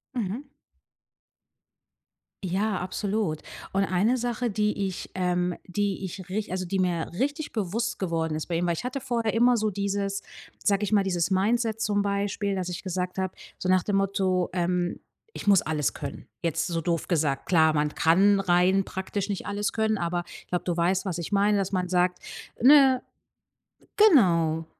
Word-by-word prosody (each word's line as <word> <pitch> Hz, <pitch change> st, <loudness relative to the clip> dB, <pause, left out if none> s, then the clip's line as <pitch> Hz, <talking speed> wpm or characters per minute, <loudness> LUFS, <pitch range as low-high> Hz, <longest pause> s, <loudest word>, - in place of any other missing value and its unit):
Mhm. 240 Hz, +6 st, -3 dB, 1.9 s
Ja, 195 Hz, +2 st, 0 dB
absolut. 185 Hz, -3 st, -2 dB, 0.3 s
Und 195 Hz, 0 st, +2 dB
eine 195 Hz, +7 st, +2 dB
Sache, 240 Hz, -1 st, -1 dB
die 210 Hz, -1 st, 0 dB
ich, 185 Hz, -, -6 dB
ähm, 180 Hz, -1 st, 0 dB
die 195 Hz, 0 st, -1 dB
ich 185 Hz, 0 st, -8 dB
rich 205 Hz, 0 st, -3 dB
also 185 Hz, 0 st, -2 dB
die 190 Hz, +2 st, -2 dB
mir 175 Hz, -3 st, 0 dB
richtig 290 Hz, +3 st, -1 dB
bewusst 230 Hz, +3 st, -2 dB
geworden 165 Hz, -4 st, -1 dB
ist 155 Hz, -, -3 dB
bei 170 Hz, -, -2 dB
ihm, 175 Hz, +1 st, 0 dB
weil 170 Hz, -, +1 dB
ich 205 Hz, -, -6 dB
hatte 255 Hz, +1 st, -3 dB
vorher 235 Hz, -4 st, -1 dB
immer 240 Hz, +1 st, +4 dB
so 215 Hz, -1 st, +1 dB
dieses 200 Hz, 0 st, -2 dB, 0.4 s
sage 200 Hz, 0 st, +2 dB
ich 210 Hz, -, -1 dB
mal, 200 Hz, -2 st, +4 dB
dieses 180 Hz, -1 st, 0 dB
Mindset 225 Hz, +3 st, +1 dB
zum 205 Hz, -1 st, +1 dB
Beispiel, 200 Hz, 0 st, -1 dB
dass 185 Hz, -1 st, -3 dB
ich 180 Hz, -, -5 dB
gesagt 180 Hz, 0 st, -3 dB
hab, 190 Hz, -1 st, -2 dB, 0.2 s
so 185 Hz, -, -4 dB
nach 185 Hz, -1 st, +3 dB
dem 205 Hz, -2 st, 0 dB
Motto, 190 Hz, -2 st, +1 dB
ähm: 180 Hz, 0 st, -1 dB, 0.3 s
„Ich -, -, -8 dB
muss 200 Hz, -3 st, +6 dB
alles 150 Hz, -2 st, -1 dB
können.“ 140 Hz, -2 st, -7 dB
Jetzt 165 Hz, -1 st, -1 dB
so 170 Hz, -2 st, -1 dB
doof 165 Hz, +1 st, -2 dB
gesagt, 150 Hz, -5 st, 0 dB
klar, 160 Hz, -3 st, +4 dB
man 150 Hz, 0 st, 0 dB
kann 195 Hz, +6 st, +4 dB
rein 185 Hz, +1 st, +3 dB
praktisch 190 Hz, +1 st, -4 dB
nicht 200 Hz, -2 st, -4 dB
alles 205 Hz, 0 st, -2 dB
können, 220 Hz, -1 st, +1 dB
aber 175 Hz, -1 st, -1 dB
ich -, -, -13 dB
glaub, 180 Hz, -, -2 dB
du 175 Hz, -1 st, -2 dB
weißt, 185 Hz, +4 st, +1 dB
was 180 Hz, -3 st, -2 dB
ich 170 Hz, +4 st, -5 dB
meine, 205 Hz, +1 st, +3 dB
dass 195 Hz, 0 st, -2 dB
man 180 Hz, -1 st, 0 dB
sagt, 180 Hz, 0 st, +1 dB, 0.4 s
ne 265 Hz, -1 st, +7 dB, 1.0 s
genau, 170 Hz, -, +4 dB
190 Hz, 175 wpm, -26 LUFS, 175-210 Hz, 1.9 s, ne